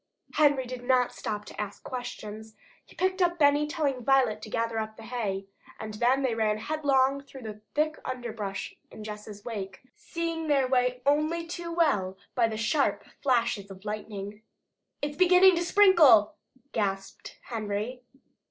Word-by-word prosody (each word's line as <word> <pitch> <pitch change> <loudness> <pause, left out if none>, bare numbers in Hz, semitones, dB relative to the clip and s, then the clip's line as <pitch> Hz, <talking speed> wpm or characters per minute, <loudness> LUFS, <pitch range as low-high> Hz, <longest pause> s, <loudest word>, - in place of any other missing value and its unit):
Henry 285 -4 +3
did 250 0 -7
not 250 -1 +2
stop 210 -1 -4
to - - -6
ask 205 -1 -7
questions. 220 -3 -7 0.3
He - - -19
picked 375 +1 0
up 350 -1 +2
Benny, 290 -1 +4
telling 290 -6 -1
Violet 255 -5 +3
to 215 - -8
gather 230 0 -1
up 220 0 -5
the 225 - -11
hay. 215 -5 -3 0.3
And 215 -1 -6
then 245 +5 +2
they 255 -3 +1
ran 215 -1 +1
headlong 275 +1 +1
through 270 -2 -12
the 215 -1 -8
thick 310 +1 +1
underbrush 225 -6 -5 0.2
in 215 - -10
Jess' 210 -1 -8
wake, 200 -5 -6
seeing 330 -1 -4
their 275 -3 +3
way 250 -1 +1
only 310 +4 +1
too 340 0 -6
well 210 - +1 0.2
by 235 -2 +3
the 220 -1 -4
sharp 275 +6 +1 0.2
flashes 235 -7 +1
of 190 +1 -12
lightning. 210 -1 -6 0.6
"It's 290 0 -3
beginning 370 +1 +7
to 345 - +1
sprinkle!" 340 - +6 0.4
gasped 195 -2 -3
Henry. 220 +2 -4
245 Hz, 155 wpm, -28 LUFS, 215-295 Hz, 0.6 s, beginning